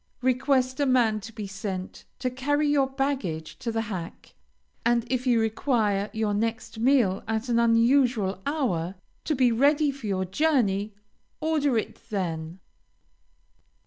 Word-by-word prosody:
Request 260 0 +1
a 285 - +2
man 235 -4 +3
to 225 - -9
be 215 -2 -6
sent, 195 -1 -6
to 255 -1 -2
carry 290 +4 0
your 285 -2 +3
baggage 265 - -3
to 245 -3 -3
the 225 0 -1
hack; 190 -7 -7 0.5
and 235 0 +2
if 255 0 -1
you 240 -2 +4
require 220 -3 0
your 220 -1 -1
next 225 +1 -2
meal 235 -6 +3
at 225 +3 -2
an 235 -1 +3
unusual 230 -4 +3
hour, 195 - -1 0.3
to 310 - 0
be 250 -2 +3
ready 285 +5 +3
for 270 -5 -8
your 190 -2 0
journey, 210 - +1 0.4
order 305 -5 +1
it 220 - -5
then. 170 -4 -3
230 Hz, 145 wpm, -26 LUFS, 205-265 Hz, 0.5 s, you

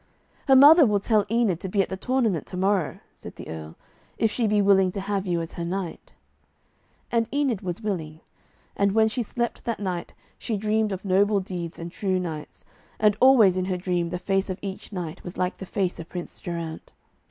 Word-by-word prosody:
'Her 270 - +6
mother 300 +5 +9
will 210 -5 +3
tell 210 0 +1
Enid 225 -7 +1
to 190 - -5
be 200 - -1
at - - -8
the 190 - -3
tournament 225 - 0
to 180 - -6
morrow,' 190 -3 +1 0.2
said - - -11
the - - -10
Earl, 80 -1 -7 0.4
'if 225 - +2
she 230 -1 0
be 210 0 +2
willing 195 -2 +4
to 200 - -3
have 195 0 -2
you 170 -2 0
as 165 - -7
her 170 - -5
knight.' 180 0 -5 1.0
And 230 -1 +1
Enid 275 -8 0
was 185 +2 -5
willing. 160 -7 -3 0.6
And 200 -1 +2
when 220 0 +4
she 230 +3 -2
slept 235 +1 -3
that 230 -2 -2
night 185 -4 -4 0.2
she 220 - -2
dreamed 215 +1 0
of 190 +1 -5
noble 200 +2 +3
deeds 180 -3 -6
and 170 +1 -7
true 190 0 -1
knights, 160 -4 -6 0.3
and 210 -1 +4
always 230 -8 +6
in 185 - 0
her 185 -1 -1
dream 175 -2 -1
the 180 - -3
face 195 +2 -1
of 185 - -3
each 195 +1 -6
knight 175 -5 -6
was 175 - -8
like 180 +1 -1
the 190 - -8
face 185 -2 -1
of 165 - -8
Prince 175 -1 -7
Geraint. 170 -2 -6
195 Hz, 210 wpm, -25 LUFS, 180-215 Hz, 1.0 s, mother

